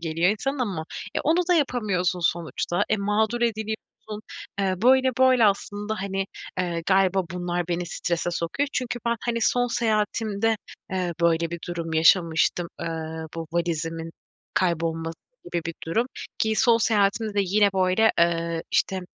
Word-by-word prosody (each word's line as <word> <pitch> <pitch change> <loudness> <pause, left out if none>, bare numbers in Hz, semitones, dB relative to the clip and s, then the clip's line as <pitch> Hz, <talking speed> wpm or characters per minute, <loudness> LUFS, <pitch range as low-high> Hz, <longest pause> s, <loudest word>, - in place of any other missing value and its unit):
geliyor 165 +2 +1
insanın 270 +7 -2
ama 195 -11 -2 0.3
e, - - 0
onu 325 +4 +3
da 360 - +5
yapamıyorsun 205 - 0
sonuçta 170 +1 0
e, 220 - +2
mağdur 215 +3 0
ediliyorsun. 220 -1 -3 0.4
Eee, 190 -1 +1
böyle 260 +1 +5
böyle 260 -2 +5
aslında, 205 +1 -1
hani, 195 0 -2 0.3
eee, 175 -2 -1
galiba 190 0 +3
bunlar 175 -1 -2
beni 175 0 -1
strese 175 0 -2
sokuyor. 175 - -1
Çünkü 245 -1 -2
ben, 235 0 +2
hani, 235 -1 -1
son 245 +2 +2
seyahatimde, 220 -1 0 0.4
eee, 180 -2 -1
böyle 170 -1 +2
bir 170 - -4
durum 170 -2 -4
yaşamıştım. 165 +1 +3
Eee, - - -3 0.5
bu 165 - -4
valizimin 165 -1 -2 0.4
kaybolması 165 -2 0 0.3
gibi 170 -1 -3
bir 165 - -4
durum, 225 +9 +1 0.3
ki 220 0 +1
son 230 0 +5
seyahatimde 215 0 +1
de 205 - +3
yine 200 +2 +3
böyle, 190 +4 +3
eee, 170 -1 +1
işte 190 -1 +1
190 Hz, 145 wpm, -25 LUFS, 170-220 Hz, 0.5 s, da